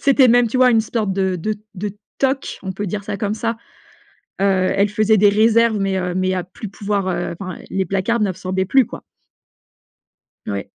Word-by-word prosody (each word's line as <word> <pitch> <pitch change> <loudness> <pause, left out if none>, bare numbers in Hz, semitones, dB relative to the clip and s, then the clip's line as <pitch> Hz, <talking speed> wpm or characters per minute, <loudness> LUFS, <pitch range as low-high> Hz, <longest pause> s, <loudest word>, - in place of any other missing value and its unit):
C'était 275 -2 +5
même, 245 0 +5
tu 255 +3 -2
vois, 255 -1 +6
une 225 - +4
sorte 215 -3 -2
de 190 -1 0
de 215 +6 -2 0.2
de 205 +2 -5 0.2
toc, 270 0 -1
on 190 -1 -4
peut 205 +2 -4
dire 205 +3 -3
ça 205 0 -4
comme 205 0 -2
ça. 230 +1 -2 0.9
Heu, 190 -2 +2
elle 200 +1 +2
faisait 215 +1 +3
des 205 +1 +6
réserves, 225 +2 +3
mais, 195 -1 0
heu, 180 -1 -2
mais, 185 0 +1
à 180 - -1
plus 190 +3 -9
pouvoir, 200 -1 -2
heu, 170 -1 -2
enfin, 185 -3 -6
les 190 0 -1
placards 195 +5 0
n’absorbaient 190 -1 -1
plus 260 +5 +4
quoi. - - -9 1.5
Oui. 100 -1 -3
200 Hz, 195 wpm, -20 LUFS, 190-225 Hz, 1.5 s, vois